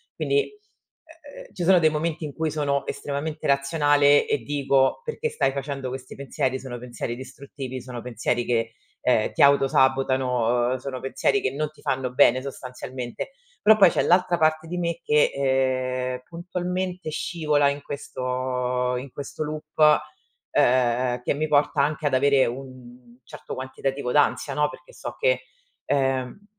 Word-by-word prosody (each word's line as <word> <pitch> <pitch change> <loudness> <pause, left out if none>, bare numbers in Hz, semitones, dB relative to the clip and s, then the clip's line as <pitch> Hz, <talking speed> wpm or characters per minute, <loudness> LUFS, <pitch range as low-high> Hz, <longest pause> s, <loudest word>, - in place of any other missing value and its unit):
Quindi, 420 0 0
uhm, 320 - -17
ci 185 - -4
sono 180 0 +6
dei 160 - +4
momenti 155 +1 -2
in 145 - -6
cui 160 +1 -2
sono 145 -2 -1
estremamente 150 +2 -4
razionale 145 +1 +4
e - - +1
dico: 140 - +1
"Perché 465 0 -3
stai 135 - +1
facendo 135 -1 -4
questi 130 0 -7
pensieri, 130 -1 -2
sono 130 -2 -7
pensieri 120 -1 -5
distruttivi, 130 0 -8
sono 125 -1 -7
pensieri 120 0 -1
che, 115 -1 0 0.3
ehm, 110 -4 +2
ti - - -1
auto 140 -1 +6
sabotano, 130 -2 +2
sono 130 -1 -5
pensieri 135 +9 0
che 130 - +1
non 150 +2 -3
ti 155 - -21
fanno 130 -1 -2
bene 130 -1 +5
sostanzialmente". 130 - -6 0.3
Però 220 +1 +7
poi 195 -4 +8
c'è - - 0
l'altra 175 0 +3
parte 155 0 +1
di 180 - -4
me 170 -1 -2
che, 150 0 +3
ehm, 130 -2 0
puntualmente 180 0 -4
scivola 150 -2 +1
in 140 0 -4
questo 125 -2 -2
in 130 0 -7
questo 145 +2 -5
loop, 155 0 +2 0.6
ehm, 125 0 +2
che - - +1
mi 155 +2 -1
porta 145 0 +2
anche 150 +1 -1
ad 140 - -1
avere 140 0 +4
un 125 -1 -9
certo - - -8
quantitativo 130 0 -3
d'ansia, 145 -1 +2
no. 150 +1 +1
Perché - - -14
so - - -7
che - - +2 0.4
ehm, 135 +6 -1
140 Hz, 155 wpm, -24 LUFS, 130-155 Hz, 0.6 s, poi